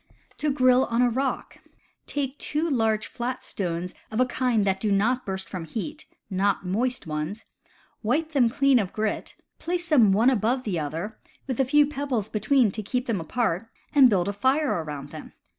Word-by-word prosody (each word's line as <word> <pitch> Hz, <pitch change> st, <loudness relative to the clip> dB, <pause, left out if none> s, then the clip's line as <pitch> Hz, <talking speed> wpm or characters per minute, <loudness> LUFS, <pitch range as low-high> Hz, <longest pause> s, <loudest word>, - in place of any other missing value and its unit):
To 300 Hz, 0 st, +1 dB
Grill 255 Hz, -1 st, +4 dB
on 235 Hz, +1 st, +1 dB
a 245 Hz, -, +3 dB
Rock. 265 Hz, +2 st, -2 dB, 0.2 s
— -, -, -40 dB
Take 275 Hz, 0 st, -2 dB
two 305 Hz, +3 st, -1 dB
large 225 Hz, -6 st, +1 dB
flat 245 Hz, +2 st, -4 dB
stones 180 Hz, -1 st, -3 dB, 0.2 s
of 220 Hz, -, -3 dB
a 255 Hz, -, +5 dB
kind 245 Hz, -4 st, +1 dB
that 190 Hz, -1 st, +1 dB
do 210 Hz, 0 st, 0 dB
not 230 Hz, +6 st, +1 dB
burst 190 Hz, 0 st, -3 dB
from 180 Hz, -4 st, -6 dB
heat 295 Hz, -, -6 dB, 0.2 s
(not 195 Hz, 0 st, 0 dB
moist 240 Hz, +7 st, -1 dB
ones), 155 Hz, +7 st, -4 dB, 0.6 s
wipe 295 Hz, +9 st, 0 dB
them 270 Hz, -7 st, +3 dB
clean 275 Hz, +1 st, +3 dB
of 195 Hz, -3 st, -3 dB
grit, 215 Hz, -1 st, -2 dB, 0.2 s
place 350 Hz, 0 st, -3 dB
them 240 Hz, -, +5 dB
one 225 Hz, +7 st, +4 dB
above 245 Hz, +2 st, +1 dB
the 190 Hz, -7 st, -2 dB
other, 165 Hz, +9 st, -4 dB, 0.3 s
with 260 Hz, -2 st, -4 dB
a 270 Hz, -, +4 dB
few 295 Hz, +3 st, +5 dB
pebbles 275 Hz, -7 st, -2 dB
between 225 Hz, +1 st, +2 dB
to 215 Hz, -, -4 dB
keep 250 Hz, +5 st, -2 dB
them 220 Hz, -8 st, -1 dB
apart, 225 Hz, +2 st, -1 dB, 0.2 s
and 275 Hz, -3 st, +7 dB
build 185 Hz, -4 st, +1 dB
a 200 Hz, -, -1 dB
fire 265 Hz, +8 st, +2 dB
around 145 Hz, -2 st, -7 dB
them. -, -, -10 dB
230 Hz, 190 wpm, -25 LUFS, 195-265 Hz, 0.6 s, and